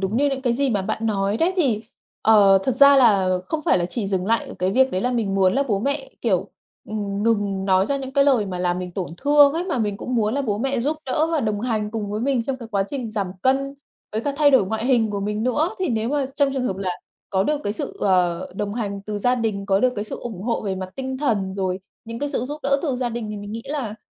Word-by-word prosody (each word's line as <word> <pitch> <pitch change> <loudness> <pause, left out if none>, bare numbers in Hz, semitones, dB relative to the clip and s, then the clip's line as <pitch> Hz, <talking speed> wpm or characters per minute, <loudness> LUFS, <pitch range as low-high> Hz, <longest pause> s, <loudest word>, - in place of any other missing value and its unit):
đúng 195 +3 -1
như 285 +3 +3
những 270 -1 -3
cái 245 -3 +2
gì 270 +2 +1
mà 205 -4 0
bạn 220 +4 -2
nói 200 -1 0
đấy 335 +7 +2
thì, 250 - +1 0.4
ờ, 200 -3 +6
thật 260 - +1
ra 280 +2 +7
là 195 -8 +4
không 310 -1 -2
phải - - +3
là 175 - 0
chỉ 205 +3 -3
dừng 190 -1 -1
lại 230 +2 +1
ở - - -8
cái 185 +1 +1
việc 265 +5 +3
đấy 185 - -1
là 250 - 0
mình 220 -5 -1
muốn 190 -1 +3
là 275 - +2
bố 205 -3 +1
mẹ, 275 +4 -2
kiểu, 195 -4 0 0.4
ừm, 205 -1 -3
ngừng 205 -4 0
nói 190 0 +3
ra 280 - 0
những 265 -1 -6
cái 280 0 +4
lời 255 -7 +3
mà 185 -2 -4
làm 180 0 0
mình 180 0 -5
tổn 180 -2 -4
thương 290 +4 +5
ấy, 335 +3 -2
mà 350 -8 -2
mình 210 -3 -1
cũng 250 - -4
muốn 220 -1 +1
là 280 - 0
bố 210 -6 -1
mẹ 270 +1 0
giúp 295 +6 0
đỡ 300 +5 +1
và 320 - +2
đồng 210 -3 -1
hành 220 -3 -1
cùng 210 -2 -4
với 210 - -2
mình 260 -1 +1
trong 260 +3 -3
cái 235 -3 -10
quá 200 -3 0
trình 255 -6 -4
giảm 200 -4 -3
cân, 275 +1 +1 0.4
với 220 - -1
cả 285 +4 -2
thay 290 -1 +5
đổi 260 -8 +4
ngoại 220 +4 -2
hình 235 -5 +3
của 200 - -3
mình 210 +2 -2
nữa. 295 +8 +1
Thì 370 -2 -1
nếu 225 -2 0
mà 285 0 0
trong 280 -1 +2
trường 260 -2 -1
hợp 190 - -2
là 190 -1 -2 0.4
có 190 -1 +2
được 295 +7 0
cái 205 - 0
sự, - - -5
ờ, 180 -2 +1
đồng 205 +1 -3
hành 200 -4 -3
từ 210 0 -4
gia 245 +4 +2
đình, 215 -5 -2
có 195 0 +2
được 255 +1 +3
cái 205 - -3
sự - - -5
ủng 220 -6 -6
hộ 230 +2 -1
về 195 -2 -2
mặt 185 0 -6
tinh 265 -1 -4
thần, 205 -9 0
rồi 185 -1 -1 0.3
những 230 0 -6
cái 290 - -2
sự 250 - -2
giúp 295 +4 -5
đỡ 275 +1 +2
từ 275 -6 -1
gia 250 -1 -1
đình 235 -1 -4
thì 210 - -5
mình 205 +1 -7
nghĩ 230 +1 -5
là 275 -7 -3
225 Hz, 285 wpm, -22 LUFS, 200-265 Hz, 0.4 s, ra